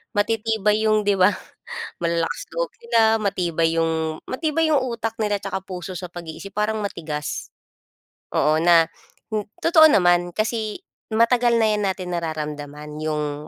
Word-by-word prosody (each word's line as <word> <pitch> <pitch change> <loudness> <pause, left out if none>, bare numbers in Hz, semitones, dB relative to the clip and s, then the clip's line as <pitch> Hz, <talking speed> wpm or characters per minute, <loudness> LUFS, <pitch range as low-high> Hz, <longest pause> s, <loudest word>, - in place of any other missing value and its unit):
matitibay 215 0 +1
'yong, 215 -1 +3
'di 205 - +4
ba, 185 +3 +6 0.7
malalakas 170 -1 -1
loob - - -1
nila, 225 - +3
matibay 170 -4 0
'yong 160 -1 -1
matibay 315 +3 0
'yong 275 - +3
utak 230 -2 -3
nila 205 -1 +1
'tsaka 190 -1 -3
puso 185 -1 -7
sa 180 +1 -5
pag-iisip, 175 +2 -8
parang 210 +1 0
matigas. 155 -7 -4 0.9
Oo, 155 +1 +3
na 170 -1 +6 0.4
hin 215 -2 -2 0.2
totoo 320 -1 +7
naman 175 -3 +3
kasi 220 +1 -2 0.3
matagal 235 +2 +3
na 220 - +4
'yan 210 0 0
natin 185 -1 -3
nararamdaman 150 -2 -5
'yong 150 -1 -3
190 Hz, 140 wpm, -22 LUFS, 165-220 Hz, 0.9 s, totoo